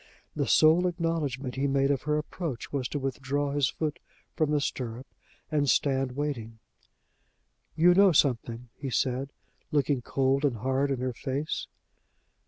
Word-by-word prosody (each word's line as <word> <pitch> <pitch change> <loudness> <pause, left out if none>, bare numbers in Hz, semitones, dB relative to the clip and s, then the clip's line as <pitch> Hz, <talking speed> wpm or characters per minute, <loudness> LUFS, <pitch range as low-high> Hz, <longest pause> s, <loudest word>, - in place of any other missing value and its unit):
The - - -1
sole 165 +4 +5
acknowledgment 160 -7 -2
he 140 +1 +1
made 135 0 +2
of 135 - 0
her 150 - +3
approach 150 -4 -5
was 135 -3 -1
to 145 - -4
withdraw 140 +1 -2
his 140 -3 +2
foot 155 -2 -3 0.3
from 155 -2 +1
the 150 -1 +2
stirrup 125 -3 -4 0.5
and 145 -2 +2
stand 135 -1 +2
waiting. 125 -6 -4 1.2
"You 175 +3 +6
know 195 +1 +6
something," 120 -5 +1
he 140 - -6
said, 130 +2 -1 0.4
looking 145 -3 +1
cold 135 +3 +1
and 140 -5 +2
hard 130 +5 0
in 135 -2 -1
her 130 -1 -1
face. 140 +5 -3
140 Hz, 150 wpm, -28 LUFS, 130-150 Hz, 1.2 s, You